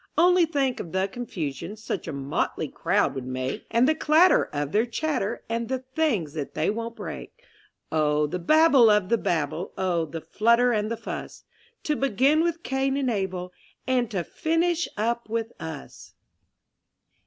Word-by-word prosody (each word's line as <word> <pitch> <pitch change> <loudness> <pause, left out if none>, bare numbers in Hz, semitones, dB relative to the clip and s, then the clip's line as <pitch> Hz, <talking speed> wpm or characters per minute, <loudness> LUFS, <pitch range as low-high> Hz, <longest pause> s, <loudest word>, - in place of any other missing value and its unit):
Only 355 0 +5
think 275 -5 0
of 170 - -7
the 190 +1 +1
confusion 180 - -5
Such 215 -4 -5
a - - -3
motley 140 0 -2
crowd - - +1
would 130 -2 -6
make; 130 0 -4
And 235 +3 +3
the 310 - +4
clatter 315 +3 +4
of 145 0 -4
their 220 +3 +2
chatter, 240 -4 -2
And 230 0 -2
the 260 - 0 0.2
things 225 - 0
that 150 -3 -5
they 155 +5 +1
won't 230 +1 -5
break 475 - -8 0.5
Oh 150 -1 +2
the 180 +5 -3
babble 285 - +6
of 210 -3 +3
the 235 - +2
Babel! 160 +1 -2
Oh, 180 -3 0
the 165 +2 -6
flutter 235 +6 +3
and 215 -2 0
the 230 - -3
fuss; - - -7 0.4
To 300 - 0
begin 275 +4 +3
with 335 0 -1
Cain 270 +1 0
and 265 -3 0
Abel, 185 -3 -3 0.3
And 250 -3 +1
to 185 -4 -2
finish 335 - 0
up 235 +2 -1
with 225 0 -2
us! 160 -3 -9
225 Hz, 165 wpm, -25 LUFS, 170-270 Hz, 0.5 s, babble